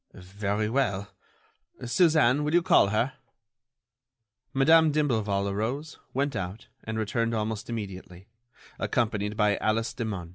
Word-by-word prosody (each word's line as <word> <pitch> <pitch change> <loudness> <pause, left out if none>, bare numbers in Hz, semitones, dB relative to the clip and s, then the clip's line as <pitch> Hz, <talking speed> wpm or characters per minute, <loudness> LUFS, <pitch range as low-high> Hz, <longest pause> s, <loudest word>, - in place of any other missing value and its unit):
"Very 100 +3 -3
well. 105 -5 -1 0.7
Suzanne, 145 0 +3
will 150 +3 0
you 175 - +4
call 175 - +5
her?" 110 +6 0 1.4
Madame 160 +3 +5
d'Imblevalle 110 -10 0
arose, 125 +10 -3
went 140 0 -1
out, 95 +2 -5 0.2
and 110 0 -4
returned 115 +1 -1
almost 110 +1 -3
immediately, 95 -4 -7 0.5
accompanied 105 -3 -1
by 105 -2 +3
Alice 115 +2 0
Demun. 100 -8 -4
110 Hz, 115 wpm, -27 LUFS, 100-135 Hz, 1.4 s, call